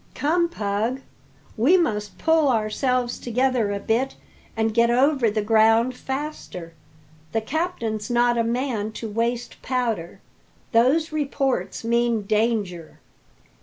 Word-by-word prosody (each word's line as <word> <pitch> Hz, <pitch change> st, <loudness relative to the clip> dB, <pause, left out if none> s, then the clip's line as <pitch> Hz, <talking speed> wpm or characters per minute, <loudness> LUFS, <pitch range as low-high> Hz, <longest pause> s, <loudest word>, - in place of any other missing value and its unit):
Come, 340 Hz, +4 st, +1 dB
Pug, 220 Hz, 0 st, -2 dB, 0.5 s
we 280 Hz, +12 st, +4 dB
must 210 Hz, -, -1 dB
pull 320 Hz, -3 st, +3 dB
ourselves 245 Hz, +2 st, 0 dB
together 245 Hz, -3 st, 0 dB
a 200 Hz, -, -2 dB
bit 240 Hz, +6 st, 0 dB, 0.4 s
and 220 Hz, 0 st, +1 dB
get 235 Hz, +1 st, +4 dB
over 260 Hz, 0 st, +3 dB
the 210 Hz, 0 st, -1 dB
ground 225 Hz, +3 st, +4 dB
faster. 265 Hz, -, -6 dB, 0.6 s
The 225 Hz, -, +1 dB
captain's 235 Hz, -, -3 dB
not 240 Hz, 0 st, +3 dB
a 230 Hz, -, +2 dB
man 230 Hz, -3 st, -2 dB
to 225 Hz, -, -5 dB
waste 235 Hz, +3 st, -2 dB
powder; 230 Hz, -10 st, -2 dB, 0.5 s
those 275 Hz, +8 st, +3 dB
reports 275 Hz, -5 st, -1 dB
mean 235 Hz, -1 st, +1 dB
danger." 210 Hz, -5 st, -1 dB
235 Hz, 120 wpm, -23 LUFS, 220-265 Hz, 0.6 s, we